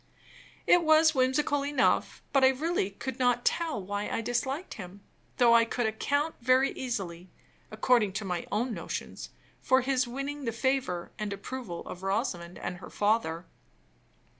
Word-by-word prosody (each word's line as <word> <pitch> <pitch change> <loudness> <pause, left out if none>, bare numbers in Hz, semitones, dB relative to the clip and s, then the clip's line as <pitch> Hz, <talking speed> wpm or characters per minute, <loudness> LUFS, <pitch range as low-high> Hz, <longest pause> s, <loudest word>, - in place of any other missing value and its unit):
It 355 - +6
was 315 0 +5
whimsical 275 +2 +1
enough; 285 -2 +1
but 275 -1 +4
I - - +9
really 265 - 0
could 250 +6 -6
not 245 -1 +2
tell 330 -10 0
why 205 +2 -3
I - - -1
disliked 265 +8 -2
him, 190 0 -10 0.4
though 240 -2 +6
I 230 0 +7
could 240 +1 -2
account 285 +8 0
very 255 +2 +4
easily, 185 -8 -5 0.4
according 215 -2 +2
to 210 +1 -3
my 180 -2 -3
own 230 +4 0
notions, - - -6 0.3
for 260 0 +3
his 260 0 +1
winning 275 +3 -5
the 230 - 0
favor 245 -7 -1
and 210 -1 -3
approval 200 -3 -6
of 180 - -8
Rosamond 190 -4 -2
and 180 - -5
her 175 - -10
father. 205 -6 0
240 Hz, 155 wpm, -29 LUFS, 200-270 Hz, 0.4 s, I